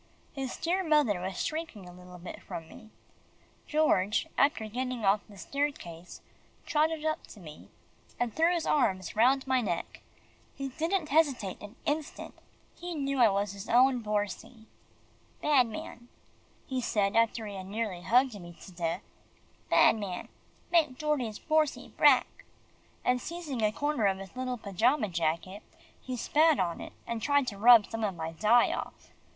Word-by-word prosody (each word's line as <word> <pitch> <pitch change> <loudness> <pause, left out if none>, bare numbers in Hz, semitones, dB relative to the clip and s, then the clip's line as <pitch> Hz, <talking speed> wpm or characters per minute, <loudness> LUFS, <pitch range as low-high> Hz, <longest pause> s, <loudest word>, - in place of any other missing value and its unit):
His 270 -3 -4
dear 365 +3 0
mother 295 - +3
was 185 0 -3
shrinking 310 - -5
a 180 - -11
little 180 0 -12
bit 175 +1 -9
from 165 -1 -7
me. 220 +5 -14 0.8
George, 215 -10 +2
after 280 -5 +2
getting 250 0 -3
off 200 +2 +4
the 205 - -14
staircase, 185 - -4 0.4
trotted 310 +1 +1
up 310 0 -2
to 215 - -13
me, 155 -4 -12 0.5
and 240 -2 -1
threw 330 +2 +3
his 345 -2 -1
arms 185 - +1
round 255 +4 +3
my 260 -1 +2
neck. 175 -7 -4 0.5
He 275 0 -4
didn't 325 +4 -1
hesitate 275 - +1
an 205 +2 -10
instant. 300 +1 -3 0.4
He 350 -1 -6
knew 275 -2 -2
I 235 -3 +7
was 200 0 -1
his 200 +1 -9
own 255 +2 +5
Borsie. 215 +2 -3 0.7
"Bad 280 -5 +4
man," 235 +2 -8 0.6
he 260 -1 -2
said 205 -4 0
after 230 0 +2
he 205 - -6
had 190 -1 -7
nearly 205 -3 -3
hugged 250 +6 +3
me 175 -1 -11
to - - -12
death, 170 -2 -3 0.7
"bad - - +6
man 195 -4 -5 0.4
make 310 -7 +3
Dordie's 265 -8 -1
Borsie 310 -2 0
brack!" - - +4 0.6
and 250 0 +2
seizing 315 -7 -5
a 215 -1 +3
corner 290 -3 0
of 190 -1 +1
his 195 +2 -10
little 255 -1 -3
pajama 220 +4 +1
jacket, 170 +4 -2 0.4
he 255 -1 -5
spat 310 +5 +3
on 175 -3 -1
it, - - -9
and 235 -1 -4
tried 285 +1 +2
to 205 -5 -5
rub 230 -1 +8
some 225 -1 -5
of 200 -4 -1
my 160 -1 -4
dye 215 +8 +3
off. - - -7
235 Hz, 160 wpm, -29 LUFS, 195-285 Hz, 0.8 s, rub